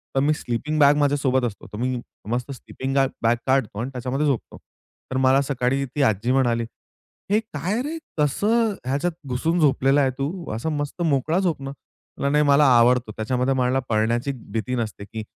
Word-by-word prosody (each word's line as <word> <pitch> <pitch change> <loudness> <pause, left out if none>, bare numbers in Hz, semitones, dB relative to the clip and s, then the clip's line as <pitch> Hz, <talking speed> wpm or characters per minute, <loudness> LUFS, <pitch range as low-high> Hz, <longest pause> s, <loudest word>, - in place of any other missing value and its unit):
तर - - +3
मी 150 +2 +3
sleeping 150 +3 -3
bag 145 0 +6
माझ्यासोबत 140 -3 +2
असतो. 110 -4 -6
तर - - -5
मी 125 +1 -1 0.3
मस्त 125 +3 -2
स्लीपिंग 135 0 -5
गा 135 -1 +4 0.2
बॅग 115 +1 +4
काढतो 130 -6 +1
आणि 120 +3 -2
त्याच्यामध्ये 130 +3 -2
झोपतो. 135 -5 -2 0.5
तर 130 - -1
मला 130 +1 +4
सकाळी 135 0 0
ती 135 +3 -4
आजी 110 +4 -1
म्हणाली, 120 -3 +2 0.7
"हे 210 +2 +4
काय 200 +1 -3
रे, 315 +4 -4 0.2
कसं 210 - +2
ह्याच्यात 145 +6 0 0.2
घुसून 165 +7 0
झोपलेला 135 -1 +3
आहे 135 -2 +3
तू 135 +1 0 0.3
असा 115 +8 -3
मस्त 145 +2 -3
मोकळा 155 +1 +1
झोप 175 -7 0
ना." 135 - -5
म्हटलं 140 0 -6
नाही, 150 0 +4
मला 145 +1 +5
आवडतो 120 -1 +3
त्याच्यामध्ये 125 +4 0
मला 130 0 +1
पडण्याची 115 +5 +1 0.2
भीती 115 +3 -2
नसते, 110 -3 -4
की 110 +2 -7
135 Hz, 180 wpm, -23 LUFS, 125-145 Hz, 0.7 s, बॅग